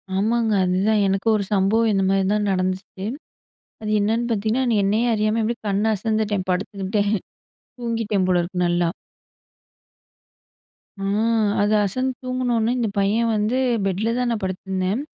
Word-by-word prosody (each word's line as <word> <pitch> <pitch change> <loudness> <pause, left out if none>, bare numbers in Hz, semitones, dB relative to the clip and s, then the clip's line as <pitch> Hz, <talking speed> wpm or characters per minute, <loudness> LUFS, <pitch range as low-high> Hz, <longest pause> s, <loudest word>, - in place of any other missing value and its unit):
ஆமாங்க. 225 +3 +1
அதுதான் 195 +4 +2
எனக்கும் 195 +3 +1
ஒரு 200 - -2
சம்பவம் 210 +4 +3
இந்தமாரி 195 0 +2
தான் 210 -1 0
நடந்துச்சு. 185 +1 -2 0.8
அது 215 - -4
என்னான்னு 225 +4 0
பாத்தீங்கன்னா, 220 +4 0
நி - - +2
என்னையே 215 +5 +1
அறியாம 215 +1 +1
இப்பிடி 230 +2 -1
கண் 200 +1 0
அசந்துட்டேன், 210 -2 -1
படுத்துக்கிட்டேன், 200 +2 -1 0.7
தூங்கிட்டேன் 225 -5 -1
போல 180 -1 +3
இருக்கு. 180 +1 -2
நல்லா! 175 -1 +1 2.1
ஆ, - - -3 0.6
அது 205 +1 +2
அசந்து 255 +6 -1
தூங்குனவுனே 245 -3 0
இந்த 235 -3 0
பையன் 225 +4 +2
வந்து 215 +4 0 0.3
பெட்ல 200 +4 0
தான் 250 -1 0
நான் 220 - -2
படுத்துருந்தேன். 190 +3 -2
210 Hz, 130 wpm, -22 LUFS, 190-225 Hz, 2.1 s, சம்பவம்